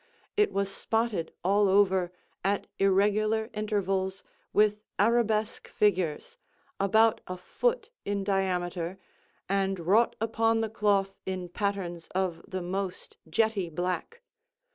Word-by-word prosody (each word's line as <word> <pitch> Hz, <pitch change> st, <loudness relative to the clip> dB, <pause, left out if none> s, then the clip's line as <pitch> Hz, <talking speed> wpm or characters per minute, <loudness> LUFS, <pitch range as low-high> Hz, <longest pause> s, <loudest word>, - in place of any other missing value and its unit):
It 420 Hz, 0 st, +3 dB
was 195 Hz, 0 st, -1 dB
spotted 225 Hz, -8 st, -1 dB
all 200 Hz, +2 st, +3 dB
over, 190 Hz, -2 st, +3 dB, 0.3 s
at 200 Hz, +2 st, +1 dB
irregular 210 Hz, +3 st, +2 dB
intervals, 195 Hz, -2 st, -1 dB, 0.3 s
with 210 Hz, 0 st, +3 dB, 0.2 s
arabesque 220 Hz, 0 st, +1 dB
figures, 205 Hz, -, 0 dB, 0.4 s
about 220 Hz, +3 st, +4 dB
a 185 Hz, -, -5 dB
foot 465 Hz, -, -1 dB
in 200 Hz, -1 st, -1 dB
diameter, 185 Hz, -2 st, -1 dB, 0.5 s
and 195 Hz, -1 st, 0 dB
wrought 200 Hz, +8 st, +3 dB
upon 225 Hz, 0 st, +1 dB
the 225 Hz, -, -1 dB
cloth 200 Hz, -3 st, +1 dB
in 185 Hz, -2 st, -3 dB
patterns 180 Hz, -3 st, -3 dB
of 185 Hz, -3 st, -1 dB
the 185 Hz, -1 st, -4 dB
most 185 Hz, +1 st, -4 dB
jetty 205 Hz, 0 st, +1 dB
black. 180 Hz, -, -3 dB
195 Hz, 115 wpm, -29 LUFS, 185-215 Hz, 0.5 s, about